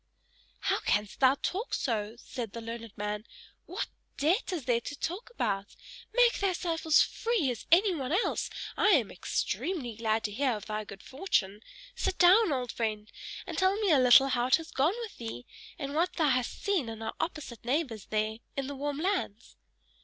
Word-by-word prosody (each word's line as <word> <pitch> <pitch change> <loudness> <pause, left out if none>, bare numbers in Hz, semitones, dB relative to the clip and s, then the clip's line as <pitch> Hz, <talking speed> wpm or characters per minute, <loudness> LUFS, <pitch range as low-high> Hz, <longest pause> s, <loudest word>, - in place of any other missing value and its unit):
"How - - +1
canst 205 0 0
thou 265 0 +6
talk 405 +6 -1
so?" 220 -3 -2
said 240 -3 -6
the 235 - -5
learned 230 -1 -7
man. 210 0 -3 0.4
"What - - -3 0.3
debt 335 - +1
is 330 -8 -3
there 235 -2 +2
to 290 +4 -7
talk 365 +8 -4
about? 200 - -2 0.4
Make 485 +1 +5
thyself 350 -4 -1
as 310 - +7
free 450 - 0
as 235 - -7
anyone 340 -7 +4
else. 370 +8 +1 0.3
I - - +3
am 230 -7 -2
extremely 245 - -2
glad 220 -1 0
to 210 - -2
hear 255 +4 +1
of 210 -1 -6
thy 215 0 -3
good 200 0 -11
fortune: 230 - -1 0.3
sit 430 -5 -2
down, 375 +2 +6
old 250 -3 -1
friend, 215 -2 -3 0.3
and - - -4
tell 375 +1 +3
me 410 -5 +2
a 290 - +6
little 255 +2 +7
how 245 -1 +1
it 260 - +6
has 325 0 -6
gone 305 +9 +2
with 450 -3 -7
thee, 225 - -6 0.3
and 280 -1 -4
what 345 +4 +1
thou 315 -4 +2
hast 255 -1 -1
seen 375 - +1
at 225 -1 -7
our 225 - -4
opposite 295 - -4
neighbor's 250 -5 -1
there 215 +1 -1 0.2
in 275 - -1
the 285 +1 -5
warm 285 +1 -3
lands." 330 - -2
265 Hz, 185 wpm, -30 LUFS, 225-345 Hz, 0.4 s, as